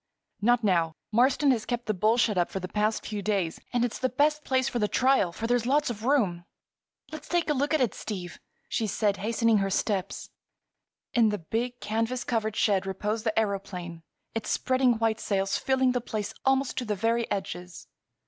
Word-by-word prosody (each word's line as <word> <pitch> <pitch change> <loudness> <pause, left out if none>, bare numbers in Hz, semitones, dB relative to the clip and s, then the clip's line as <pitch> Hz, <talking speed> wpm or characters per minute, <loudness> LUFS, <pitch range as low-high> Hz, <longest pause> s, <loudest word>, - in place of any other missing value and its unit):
"Not 240 +2 +3
now. 170 -5 +2 0.2
Marston 260 +5 +4
has 230 -4 0
kept 240 -1 -3
the 215 - 0
bull 215 +5 +2
shut 225 -3 +2
up 175 -1 +1
the 190 -1 -4
past 210 +3 -1
few 210 -2 -4
days. 195 -5 -1
And 245 -1 +2
it's 240 - -4
the 255 - +1
best 300 +3 +1
place 260 -1 +1
for 240 - -2
the 210 - +2
trial, 255 -7 +3
for 220 +6 -5
there's 240 0 +1
lots 290 0 +2
of 220 0 -7
room." 210 -11 +2 0.7
"Let's 310 - -8
take 345 -3 +1
a - - +3
look 285 +1 0
at 310 -3 +2
it, 240 -6 +1
Steve!" 180 -5 -6 0.3
she 220 - -1
said, 205 0 0
hastening 225 +1 +2
her 195 0 0
steps. 195 0 -2 0.8
In 230 -3 +4
the 210 - -1
big, 235 +8 -3
canvas 230 +3 -1
covered 220 -2 -1
shed 195 -3 +2
reposed 210 +4 -2
the 220 - +1
aëroplane, 195 -5 -2 0.3
its 225 - -3
spreading 255 -1 +2
white 225 -1 0
sails 195 -3 0
filling 260 -1 +2
the 250 -1 -1
place 215 -3 -4
almost 270 0 +2
to 250 - -4
the 210 -2 -1
very 230 +3 0
edges. 180 -2 -5
225 Hz, 195 wpm, -27 LUFS, 200-250 Hz, 0.8 s, Marston